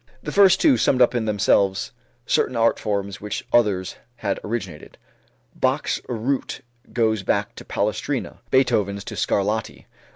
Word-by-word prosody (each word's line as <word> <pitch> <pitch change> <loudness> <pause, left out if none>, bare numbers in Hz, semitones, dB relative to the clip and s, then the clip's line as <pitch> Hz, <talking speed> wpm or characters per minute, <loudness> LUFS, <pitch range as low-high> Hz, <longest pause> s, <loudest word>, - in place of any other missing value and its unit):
The - - -4
first 195 -2 +5
two 290 -5 +4
summed 130 - +2
up 125 - +5
in 120 -2 -1
themselves 100 -2 +1 0.3
certain 130 - +1
art 115 0 +2
forms 100 -2 -3
which 105 0 -5
others 100 -6 +2 0.2
had 100 -5 -2
originated. 95 -8 -6 0.6
Bach's - - 0
root 125 +3 -2 0.3
goes 110 -3 +1
back 105 +4 -1
to - - -9
Palestrina, 110 +6 -2
Beethoven's 100 -7 +1
to - - -7
Scarlatti. 105 +2 -1
110 Hz, 135 wpm, -22 LUFS, 100-120 Hz, 0.6 s, first